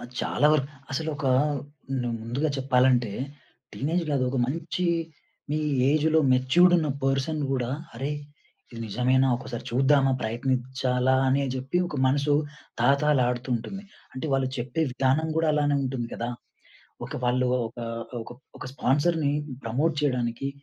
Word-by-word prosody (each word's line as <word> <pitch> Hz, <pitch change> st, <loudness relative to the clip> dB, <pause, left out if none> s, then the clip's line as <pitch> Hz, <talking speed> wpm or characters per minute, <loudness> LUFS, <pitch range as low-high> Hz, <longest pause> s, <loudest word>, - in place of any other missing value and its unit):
ఆహ్, -, -, -9 dB
చాలా 150 Hz, -, +2 dB
వరకు 140 Hz, -3 st, +1 dB, 0.2 s
అసలు 160 Hz, +4 st, -2 dB
ఒక 145 Hz, -3 st, -3 dB, 0.8 s
న్ -, -, -4 dB, 0.2 s
ముందుగా 125 Hz, +7 st, -1 dB
చెప్పాలంటే. 125 Hz, -4 st, +3 dB, 0.6 s
టీనేజ్‌లో 160 Hz, +2 st, -1 dB
అది 130 Hz, -, +1 dB
ఒక 135 Hz, -, -1 dB
మంచి 165 Hz, +6 st, -3 dB, 0.7 s
మీ 150 Hz, -, +1 dB, 0.3 s
ఏజ్‌లో 155 Hz, +1 st, +3 dB
మెచ్యూర్డ్ 130 Hz, +8 st, +5 dB
ఉన్న 155 Hz, -2 st, 0 dB, 0.2 s
పర్సన్ 135 Hz, +3 st, 0 dB
గూడా 125 Hz, -3 st, -1 dB, 0.2 s
అరేయ్! 140 Hz, +5 st, -3 dB, 0.5 s
ఇది 115 Hz, -, -8 dB
నిజమేనా? 130 Hz, +4 st, +2 dB
ఒక్కసారి 120 Hz, -2 st, -7 dB
చూద్దామా 135 Hz, +2 st, +4 dB
ప్రయత్నిచ్చాలా 125 Hz, +2 st, 0 dB
అని 135 Hz, +2 st, +3 dB
జెప్పి 130 Hz, +7 st, -1 dB
ఒక 150 Hz, -, -5 dB
మనసు 140 Hz, +2 st, +2 dB, 0.5 s
తహాతహాలాడుతూంటుంది. 130 Hz, -, +1 dB, 0.3 s
అంటే 130 Hz, +4 st, -4 dB
వాళ్ళు 135 Hz, -1 st, +1 dB
చెప్పే 135 Hz, +7 st, -1 dB
విధానం 135 Hz, +5 st, +1 dB
గూడా 160 Hz, -1 st, +2 dB
అలానే 145 Hz, -1 st, +2 dB
ఉంటుంది 130 Hz, -3 st, -3 dB
కదా! 120 Hz, -, -3 dB, 0.8 s
ఒక -, -, -7 dB
వాళ్ళు 125 Hz, +1 st, +2 dB, 0.2 s
ఒక 120 Hz, +2 st, -12 dB, 0.4 s
ఒక -, -, -12 dB, 0.3 s
ఒక -, -, -7 dB
స్పాన్సర్‌ని 145 Hz, +3 st, +1 dB, 0.3 s
ప్రమోట్ 140 Hz, +8 st, +1 dB
చేయడానికి 125 Hz, -2 st, -1 dB
135 Hz, 130 wpm, -26 LUFS, 125-150 Hz, 0.8 s, మెచ్యూర్డ్